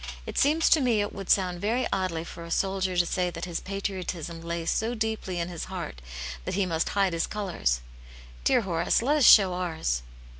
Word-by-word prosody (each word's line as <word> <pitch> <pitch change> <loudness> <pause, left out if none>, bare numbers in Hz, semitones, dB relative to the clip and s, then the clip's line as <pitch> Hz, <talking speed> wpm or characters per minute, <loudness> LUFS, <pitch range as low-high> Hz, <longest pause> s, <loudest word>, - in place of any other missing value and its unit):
It - - -7
seems 310 +3 +3
to 315 - +6
me 240 -4 +2
it 205 0 -1
would 195 -1 -7
sound 180 -3 +2
very 235 +5 +1
oddly 185 -4 -1
for 170 0 -9
a 170 - -9
soldier 190 0 0
to 175 - +4
say 180 +1 0
that 170 0 -5
his 175 -2 -3
patriotism 185 -4 -4
lay 170 0 -4
so 225 +7 0
deeply 220 -5 -2
in 170 - -1
his 175 -3 -5
heart 170 - -6 0.4
that - - -3
he 200 -1 +2
must 165 -2 -1
hide 195 -3 +3
his 165 - 0
colours. 175 - -1 0.6
Dear - - +4
Horace, 175 +1 +1
let 290 +5 +3
us 285 - +4
show 195 -5 +8
ours." 160 - -1
185 Hz, 200 wpm, -27 LUFS, 170-205 Hz, 0.6 s, show